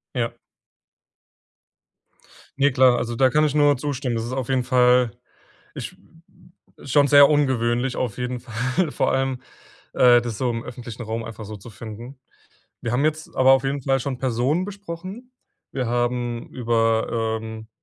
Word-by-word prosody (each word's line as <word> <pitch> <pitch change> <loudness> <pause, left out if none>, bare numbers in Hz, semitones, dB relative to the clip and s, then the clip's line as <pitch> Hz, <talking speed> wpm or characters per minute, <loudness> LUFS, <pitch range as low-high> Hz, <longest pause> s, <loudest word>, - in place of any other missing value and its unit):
Ja. 115 -2 -1 2.3
Ne, 140 -1 +4
klar, 130 -1 +5
also, 120 0 -3
da 130 +2 +3
kann 150 +3 +3
ich 150 -1 0
nur 145 -1 +4
zustimmen. 130 -3 -3
Das 115 - -2
ist 120 - -5
auf 130 -2 -3
jeden 130 -2 +1
Fall 125 -2 +4 0.6
ich - - -7 0.9
schon 140 +1 +3
sehr 145 0 +7
ungewöhnlich 130 -3 +1
auf 120 -3 -3
jeden 125 0 -3
Fall, 130 +8 -1
vor - - 0
allem, 135 -1 -1 0.5
äh, 120 -1 +6
das 120 -3 -5
so 125 -2 0
im 115 0 -4
öffentlichen 120 -1 -8
Raum 115 0 -4
einfach 110 -1 -8
so 105 +1 -8
zu 105 +4 -12
finden. 115 +5 -10 0.6
Wir 120 - -3
haben 135 +4 +1
jetzt 155 0 -2
aber 130 0 +6
auf 135 0 +3
jeden 135 0 -2
Fall 135 0 +1
schon 130 0 -3
Personen 130 +7 0
besprochen. 200 +4 -8 0.4
Wir 130 -3 -2
haben 120 0 -1
über, 115 -1 0
ähm 110 0 -8
125 Hz, 160 wpm, -23 LUFS, 115-135 Hz, 2.3 s, sehr